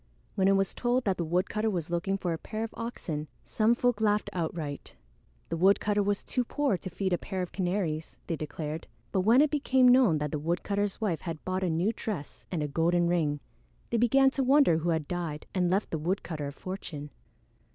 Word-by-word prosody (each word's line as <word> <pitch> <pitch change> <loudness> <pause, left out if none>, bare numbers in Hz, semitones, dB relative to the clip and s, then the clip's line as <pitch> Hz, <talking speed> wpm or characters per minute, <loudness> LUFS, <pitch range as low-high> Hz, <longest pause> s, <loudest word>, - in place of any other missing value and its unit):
When 190 -1 +2
it 195 - +5
was 195 -1 +1
told 245 +1 +1
that 190 -3 +1
the 170 - -1
woodcutter 185 +6 0
was 175 -5 -3
looking 185 +3 0
for 180 -3 -2
a - - -2
pair 220 +5 -4
of 225 - -5
oxen, 165 -10 -4 0.2
some 225 +2 +2
folk 245 -3 +1
laughed 210 -1 +2
outright. 160 -4 -4 0.5
The 165 - -2
woodcutter 200 +3 +3
was 200 0 0
too 250 - 0
poor 280 -1 0
to 185 - -6
feed 185 +1 -1
a 175 - +1
pair 190 -2 -3
of 180 - -6
canaries, 175 -4 -2
they 165 - -2
declared; 155 +1 -5 0.2
but 190 - +2
when 230 +8 +6
it 300 - +3
became 265 -3 +3
known 245 -10 +6
that 150 -1 -2
the 150 - -2
woodcutter's 195 +5 -1
wife 190 -7 0
had 165 -3 -6
bought 185 0 -1
a 185 - +1
new 175 +7 +1
dress 185 -13 -6
and 165 -4 -1
a - - -1
golden 170 +4 +2
ring, 150 -4 +1 0.5
they 235 - +2
began 265 +4 +5
to 270 - 0
wonder 265 - +5
who 170 +2 -1
had 160 -3 0
died 170 -4 -4
and 180 -2 +2
left 195 +3 0
the 160 - -1
woodcutter 160 -3 -2
a - - -5
fortune. 150 -3 -7
185 Hz, 210 wpm, -29 LUFS, 165-215 Hz, 0.5 s, when